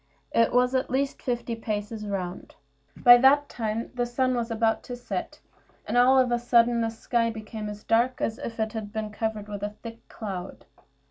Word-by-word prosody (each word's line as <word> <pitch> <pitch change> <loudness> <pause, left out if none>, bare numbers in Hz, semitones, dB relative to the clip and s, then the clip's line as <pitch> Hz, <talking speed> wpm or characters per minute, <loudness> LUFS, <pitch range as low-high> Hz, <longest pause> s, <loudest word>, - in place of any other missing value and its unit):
It 230 0 +3
was 250 +1 +3
at 260 0 0
least 270 +2 -1
fifty 240 -2 -2
paces 215 -1 -4
round. 185 -3 -5 0.4
By 245 0 +9
this 265 +3 +6
time 225 0 -3
the 245 -1 -1
sun 255 +1 0
was 240 -1 -2
about 225 -1 +1
to 245 - -5
set, 245 - -5 0.5
and - - -3
all 250 +2 +6
of 255 -2 +3
a 240 - +2
sudden 235 0 +3
the 225 - 0
sky 230 +1 0
became 220 -1 -6
as 210 0 -8
dark 240 +3 +2
as 225 - -2
if 230 -1 -6
it 220 0 -1
had 215 -2 -5
been 215 -1 -4
covered 215 -1 -3
with 205 -1 -6
a 205 +1 -4
thick 230 0 -10
cloud. 190 -4 -7
230 Hz, 195 wpm, -26 LUFS, 215-245 Hz, 0.5 s, By